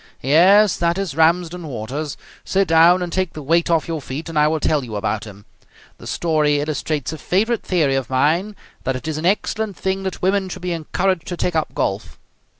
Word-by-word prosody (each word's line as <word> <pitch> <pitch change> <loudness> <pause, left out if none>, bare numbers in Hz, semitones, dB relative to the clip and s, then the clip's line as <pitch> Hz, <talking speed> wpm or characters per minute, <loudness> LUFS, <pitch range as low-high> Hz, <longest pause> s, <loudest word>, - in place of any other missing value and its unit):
Yes, 185 - +5
that 170 +1 0
is 195 -6 -3
Ramsden 170 +1 +1
Waters. 140 +4 -5 0.3
Sit 195 0 +1
down 170 +3 +5
and 175 - -5
take 185 -2 -1
the 155 - -8
weight 165 +5 +2
off 165 -2 +1
your 165 -2 -3
feet, 145 +6 -6
and 160 -2 0
I 150 - +5
will 160 +1 0
tell 150 -2 +1
you 115 -4 -7
about 110 +1 -2
him. 100 -1 -12 0.5
The - - -10
story 150 -3 +1
illustrates 150 0 -2
a 160 - -7
favourite 220 +5 0
theory 160 -7 +1
of 135 -3 -2
mine, 160 +10 +1 0.3
that 130 0 -1
it 130 - -6
is 155 -1 -2
an 165 - 0
excellent 210 +1 -1
thing 190 0 -2
that 190 -1 -4
women 190 0 +1
should 180 - -8
be 180 - -2
encouraged 170 +2 -1
to 175 - -4
take 175 -1 -1
up 160 - -1
golf. 100 +3 -2
165 Hz, 210 wpm, -20 LUFS, 145-180 Hz, 0.5 s, Yes